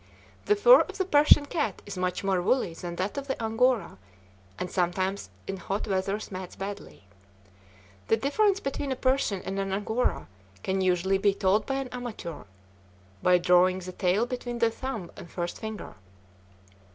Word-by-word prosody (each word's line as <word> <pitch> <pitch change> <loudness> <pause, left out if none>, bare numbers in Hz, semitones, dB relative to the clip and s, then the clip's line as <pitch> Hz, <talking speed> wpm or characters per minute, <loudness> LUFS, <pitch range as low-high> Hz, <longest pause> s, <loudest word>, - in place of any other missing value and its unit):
The 420 - +4
fur - - +8
of - - -5
the 380 - 0
Persian 295 -3 +6
cat 285 - -2
is 205 - -7
much 180 0 -2
more 190 -2 +1
woolly 185 -2 +1
than 175 +1 -6
that 190 +9 -2
of 280 - -9
the 265 - -3
Angora, 225 - +1 0.6
and 180 - -4
sometimes 185 +2 -1 0.2
in 195 - -4
hot 195 +4 -3
weather 195 +1 0
mats 185 -1 -7
badly. 195 - -7 1.0
The 225 - +3
difference 390 - +2
between 275 -3 -3
a - - 0
Persian 255 -7 0
and 195 +1 -3
an 195 0 -2
Angora 205 - -1 0.4
can 190 0 0
usually 185 +1 +2
be 200 0 +3
told 200 +2 +2
by 270 - -1
an 270 -1 -2
amateur, 240 -10 -7 0.8
by 180 0 +5
drawing 180 +1 +4
the 185 0 -7
tail 185 +5 +1
between 245 -1 -5
the 230 -1 +2
thumb 225 -7 -5
and 170 - -10
first 175 0 -4
finger. 220 -1 -6
200 Hz, 165 wpm, -27 LUFS, 185-250 Hz, 1.0 s, fur